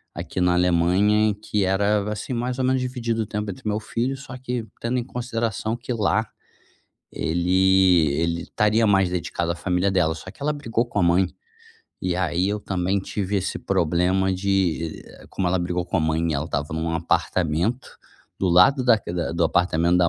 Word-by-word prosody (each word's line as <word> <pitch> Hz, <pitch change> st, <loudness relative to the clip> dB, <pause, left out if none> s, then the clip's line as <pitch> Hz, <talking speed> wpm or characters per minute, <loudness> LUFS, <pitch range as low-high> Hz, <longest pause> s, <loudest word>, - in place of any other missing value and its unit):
aqui 90 Hz, -, -4 dB
na 90 Hz, 0 st, +3 dB
Alemanha 90 Hz, +5 st, +3 dB
e 105 Hz, -, -1 dB
que 105 Hz, -1 st, -2 dB
era, 100 Hz, +2 st, +1 dB
assim, 105 Hz, +4 st, -4 dB
mais 125 Hz, +2 st, -2 dB
ou 130 Hz, -, +1 dB
menos 130 Hz, 0 st, +2 dB
dividido 120 Hz, -3 st, -2 dB
o -, -, -6 dB
tempo 105 Hz, 0 st, -3 dB
entre 95 Hz, -, -9 dB
meu 105 Hz, 0 st, 0 dB
filho, 120 Hz, +4 st, -2 dB
só 135 Hz, -1 st, -9 dB
que 125 Hz, -2 st, -4 dB, 0.2 s
tendo 120 Hz, +2 st, -1 dB
em 120 Hz, -, -1 dB
consideração 115 Hz, -3 st, -3 dB
que 125 Hz, +1 st, -4 dB
lá 110 Hz, -3 st, +1 dB, 0.9 s
ele 90 Hz, 0 st, +3 dB
ele 85 Hz, 0 st, -1 dB
estaria 110 Hz, +2 st, +1 dB
mais 95 Hz, -3 st, +3 dB
dedicado 85 Hz, -1 st, -2 dB
à -, -, -8 dB
família 90 Hz, +2 st, 0 dB
dela. 85 Hz, -4 st, +2 dB
Só 80 Hz, +4 st, -9 dB
que 110 Hz, -, -14 dB
ela 150 Hz, +1 st, +1 dB
brigou 120 Hz, -6 st, -1 dB
com 120 Hz, -, -4 dB
a -, -, +3 dB
mãe, 90 Hz, +2 st, +3 dB, 0.7 s
e 90 Hz, -1 st, -1 dB
aí 90 Hz, +1 st, 0 dB
eu 105 Hz, +1 st, -1 dB
também 95 Hz, 0 st, -1 dB
tive 100 Hz, +1 st, -3 dB
esse 95 Hz, -1 st, -2 dB
problema 90 Hz, +3 st, +1 dB
de 95 Hz, -4 st, -1 dB
eh, -, -, -15 dB
como 95 Hz, -, -2 dB
ela 95 Hz, +1 st, +1 dB
brigou 90 Hz, 0 st, -2 dB
com -, -, -2 dB
a -, -, +2 dB
mãe 80 Hz, +1 st, 0 dB
e -, -, 0 dB
ela 70 Hz, +2 st, -2 dB
estava 75 Hz, -3 st, -2 dB
em -, -, -2 dB
um 80 Hz, +1 st, -2 dB
apartamento 85 Hz, +7 st, 0 dB, 0.5 s
do 95 Hz, -, +2 dB
lado 90 Hz, +10 st, +5 dB
da 120 Hz, -2 st, +6 dB
c 100 Hz, -, -7 dB
da 85 Hz, -1 st, -2 dB
do 85 Hz, 0 st, +1 dB
apartamento 85 Hz, +1 st, +2 dB
da 85 Hz, -1 st, +4 dB
95 Hz, 200 wpm, -23 LUFS, 85-110 Hz, 0.9 s, da